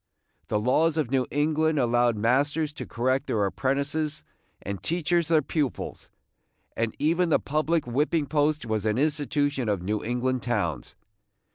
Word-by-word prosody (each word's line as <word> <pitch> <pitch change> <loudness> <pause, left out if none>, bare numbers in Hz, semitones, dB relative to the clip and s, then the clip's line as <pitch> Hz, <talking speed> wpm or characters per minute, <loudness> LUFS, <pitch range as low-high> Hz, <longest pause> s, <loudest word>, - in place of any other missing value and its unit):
The 105 - 0
laws 155 +8 +2
of 145 -6 -1
New 130 -2 +1
England 155 +2 +1
allowed 120 -2 +2
masters 145 +7 +1
to - - -7
correct 130 +3 0
their 105 -3 +1
apprentices, 140 +7 -1 0.4
and 100 -2 -5
teachers 170 - 0
their 160 -2 +3
pupils, 140 -2 -3 0.3
– - - -45
and 115 -1 -1
even 170 +3 +2
the - - +5
public 155 +2 0
whipping 145 +5 0
post 150 -1 +1
was 110 -1 -1
an 105 +1 +1
institution 145 -3 0
of 100 -4 -1
New 105 +3 -2
England 125 +2 -1
towns. 85 - -2
140 Hz, 150 wpm, -26 LUFS, 120-155 Hz, 0.4 s, the